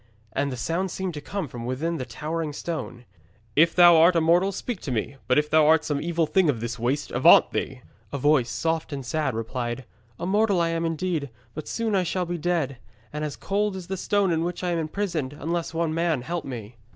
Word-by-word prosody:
And 140 0 0
the 125 - -5
sound 170 +9 -1
seemed 185 0 -3
to 150 - -6
come 195 +2 -4
from 120 -2 -8
within 145 +8 -2
the 130 -3 -5
towering 155 +5 -4
stone. 165 +2 -4
He - - -14
cried 120 - -17
out, 100 +4 -33
'If 165 0 +3
thou 175 -2 +8
art 170 +2 +6
a - - +5
mortal, 175 +4 +3
speak 210 +1 -5
to 140 - -5
me! 125 +4 -2
But 125 - +3
if 150 0 +3
thou 155 0 +4
art 160 0 +4
some 145 -2 -1
evil 170 0 0
thing 180 +1 +2
of 125 -6 0
this 120 +1 -4
waste, 130 +5 -1
avaunt - - +6
thee!' - - -3 0.3
A 140 - -2
voice, 140 -3 +3
soft 160 +5 -1
and 135 -3 -5
sad, 135 0 -1
replied, 120 +2 -3 0.3
'A - - -4
mortal 205 0 +2
I 170 0 +2
am 165 0 -1
indeed, 165 -3 -2 0.2
but 155 - -7
soon 215 -5 0
shall 180 +1 -1
I 175 - -6
be 175 - -2
dead, 155 -7 -1 0.3
and 150 0 -3
as 150 -2 -3
cold 205 0 -1
as 185 -2 -6
the 190 - -3
stone 200 0 +1
in 165 0 +1
which 175 +1 -4
I 180 - 0
am 170 - 0
imprisoned, 160 -4 -2
unless 170 +2 -2
one 165 -1 -1
man 165 -5 0
help 170 +2 -3
me.' 120 -3 -7
160 Hz, 235 wpm, -25 LUFS, 135-175 Hz, 0.3 s, thou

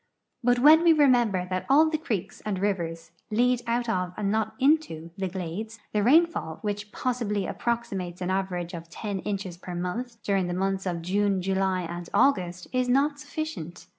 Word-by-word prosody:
But 245 +1 +4
when 305 +6 +7
we 335 -1 +6
remember 240 - +3
that 185 0 -2
all 300 +4 +6
the 310 -1 -1
creeks 215 - -4
and 205 -3 -2
rivers 170 -5 -2 0.2
lead 245 +3 +2
out 240 +1 0
of 180 -4 -1
and 200 -1 0
not 220 0 -1
into 260 - +1
the 190 -1 -2
glades, 190 +5 -5 0.2
the 210 - +2
rainfall, 300 - +3
which 205 0 -3
possibly 220 -6 -1
approximate.'^ 200 -8 -3
an 185 0 -2
average 185 -2 -2
of 165 -1 -8
ten 200 0 -4
inches 195 -3 -4
jier 180 -1 -6
month 230 +7 -4
during 195 -3 +1
the 175 - -2
months 190 0 -1
of 170 -2 -2
June, 200 +2 +1
July, 190 0 0
and 170 0 -6
August, 180 -9 +2
is 255 0 +1
not 285 +3 +2
sufficient. 285 - -6
200 Hz, 175 wpm, -27 LUFS, 180-245 Hz, 0.2 s, when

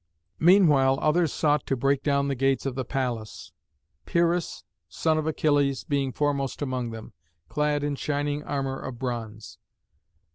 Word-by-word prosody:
Meanwhile 155 -7 +5
others 160 +1 +2
sought 150 -1 +1
to 135 - +1
break 135 +2 +1
down 140 -1 +1
the 140 - 0
gates 135 +1 0
of 135 - -1
the 130 +1 -3
palace, 125 -5 -4 0.6
Pyrrhus, 170 0 0 0.3
son 155 - +1
of 155 - -3
Achilles, 145 -3 +1
being 140 -2 -1
foremost 140 -1 -1
among 130 -3 -2
them, 110 -1 -9 0.4
clad 150 -1 0
in 145 0 -1
shining 145 +1 -2
armour 135 -2 -3
of 130 -2 -7
bronze. 115 -3 -6
140 Hz, 145 wpm, -26 LUFS, 130-150 Hz, 0.6 s, Meanwhile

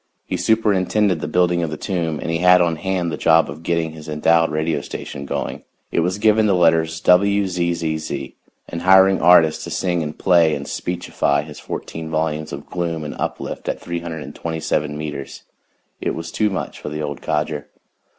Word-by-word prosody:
He - - -3
superintended 105 -4 +2
the - - -3
building 90 +1 +2
of 80 - -1
the 75 - -5
tomb 85 -5 -2
and - - -3
he 80 - 0
had 90 +1 +6
on 85 -2 +1
hand 90 -1 -1
the - - -3
job 80 -3 +4
of 75 +3 -9
getting 85 -1 -1
his 80 0 -10
endowed 80 +2 +3
radio 75 -1 -1
station 70 0 -7
going - - -4 0.3
it - - +1
was 90 +3 0
given 110 0 +4
the 100 - +3
letters 80 -2 +3
WZZZ 85 -5 +1 0.3
and 85 - -5
hiring 95 +1 +6
artists 85 -3 +5
to - - -6
sing 90 -2 -1
and 75 -1 -5
play 85 -4 +4
and 70 0 -6
speechify 85 -5 -1
his 75 0 -10
fourteen 80 0 -6
volumes 80 -1 -2
of 70 +1 -7
gloom 85 -3 -3
and 75 - -5
uplift - - -4
at - - -2
327 80 -2 -3
meters, 75 -3 -6 0.6
and - - -3
it - - -1
was 85 0 -6
too 105 -1 +1
much 95 - -4
for - - -5
the 75 +1 -4
old 70 -2 -5
codger. 75 -1 -2
80 Hz, 180 wpm, -20 LUFS, 75-90 Hz, 0.6 s, had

